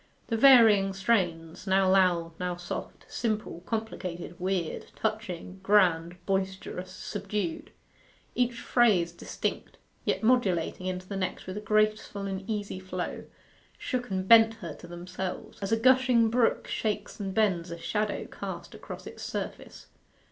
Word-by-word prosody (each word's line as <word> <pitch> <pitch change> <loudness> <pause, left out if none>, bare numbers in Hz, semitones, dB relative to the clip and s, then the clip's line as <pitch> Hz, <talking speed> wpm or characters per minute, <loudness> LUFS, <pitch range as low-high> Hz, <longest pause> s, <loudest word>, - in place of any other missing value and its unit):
The 230 - +1
varying 225 -6 +7
strains 185 -4 0
now 190 0 +4
loud, 180 -3 +3
now 180 -1 -2
soft; 175 0 -6
simple, 215 -6 -2
complicated, 185 -6 -4
weird, 185 -2 -2
touching, 195 -4 -3
grand, 180 -4 +3
boisterous, 190 -1 -2
subdued; 200 -2 -4 0.6
each 245 -1 0
phase 205 -9 +3
distinct, 170 - -4 0.3
yet - - -1
modulating 190 -7 +2
into 185 0 -4
the 200 - -5
next 185 -1 -3
with 185 - -6
a - - -4
graceful 215 -1 +1
and 195 0 -4
easy 205 -3 -3
flow 185 -1 -5 0.5
shook 245 -2 -3
and 190 -1 -2
bent 225 0 +7
her 190 -7 -7
to 175 - -12
themselves, 180 +2 -6
as 195 - -3
a 225 - +4
gushing 250 -2 +4
brook 235 -1 +2
shakes 210 -1 -3
and 195 -2 -4
bends 190 -6 +2
a 170 - -5
shadow 210 +4 -2
cast - - -7
across - - -9
its - - -9
surface. - - -6
195 Hz, 140 wpm, -28 LUFS, 180-220 Hz, 0.6 s, varying